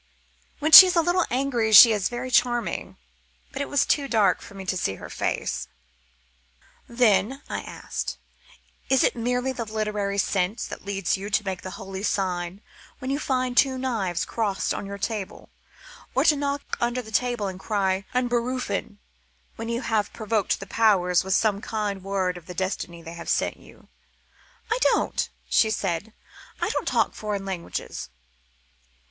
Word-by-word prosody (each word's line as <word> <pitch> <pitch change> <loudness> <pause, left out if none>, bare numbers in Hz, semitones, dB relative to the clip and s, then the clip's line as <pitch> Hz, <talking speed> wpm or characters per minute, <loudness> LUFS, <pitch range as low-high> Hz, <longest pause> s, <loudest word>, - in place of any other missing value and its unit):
When 310 +1 -1
she 375 +4 +13
is 365 - 0
a 335 - +5
little 350 +2 +1
angry 245 -4 0
she 230 +2 +11
is 205 -3 0
very 245 +1 -5
charming, 240 -1 0 0.5
but 275 - -5
it 280 - -3
was 285 -3 +2
too 280 -2 +1
dark 210 -7 +2
for 200 - -12
me 195 -1 -8
to 185 - -1
see 95 - -1
her - - -10
face. - - -2 1.2
"Then," 235 +2 +2
I - - -4
asked, - - -5 0.7
"it 265 -1 +4
is - - +3
merely 250 +2 -1
the 245 -3 -4
literary 210 -2 -2
sense 195 +3 0
that - - -9
leads 195 -2 -1
you 200 +2 -6
to 210 0 +1
make 190 -2 -3
the 185 - -7
Holy 195 -2 -7
Sign 185 -2 -2 0.4
when 260 +1 -4
you 280 - -1
find 255 -3 -1
two 260 +1 +4
knives 220 -10 -1
crossed 205 -4 -1
on 200 - -5
your 200 0 -6
table, 205 -1 -5 0.7
or - - +3
to 305 - +6
knock 280 0 -3
under 240 +1 0
the 220 - -12
table 240 -1 0
and 190 -1 -6
cry 195 -2 0
'Unberufen' 245 -4 -1 0.6
when 225 +1 -6
you 235 +1 -2
have 220 -5 0
provoked 215 -2 -1
the 195 - -7
Powers 185 -5 +3
with 190 +1 0
some 210 -2 +1
kind 205 -4 -3
word 190 -2 -1
of 170 - -13
the 180 - -8
destiny 175 -2 -4
they 165 - -8
have 170 0 -8
sent - - 0
you?" - - -18 0.8
"I 455 - +1
don't," - - +1 0.2
she 220 - +3
said. 195 0 -2 0.5
"I - - 0
don't - - -2
talk - - +1
foreign 205 -2 -4
languages." 170 - -5
215 Hz, 170 wpm, -25 LUFS, 195-245 Hz, 1.2 s, she